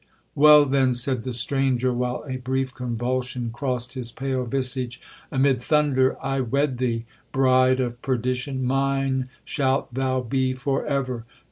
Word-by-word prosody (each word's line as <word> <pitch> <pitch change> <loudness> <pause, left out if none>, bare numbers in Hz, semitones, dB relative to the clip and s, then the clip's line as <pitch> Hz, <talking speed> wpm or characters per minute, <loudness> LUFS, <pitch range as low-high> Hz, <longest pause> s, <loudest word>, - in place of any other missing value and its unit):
'Well, 150 0 +7
then,' 130 -2 +2
said 125 0 +1
the 130 - -4
stranger, 130 +1 0
while 125 +2 -2
a 130 -1 -3
brief 130 +1 -2
convulsion 125 0 -3
crossed 125 -1 -2
his 125 -3 -3
pale 130 0 -2
visage, 130 -1 -1 0.3
'amid 135 -2 +2
thunder 140 -2 +2
I 135 0 -1
wed 135 +1 0
thee—bride 130 +2 +1
of 120 -1 -2
perdition! 130 +1 -1
mine 135 0 0 0.2
shalt 135 -3 0
thou 130 0 0
be 130 +1 0
for 135 +1 -1
ever! 130 -5 -2
130 Hz, 135 wpm, -24 LUFS, 125-135 Hz, 0.3 s, Well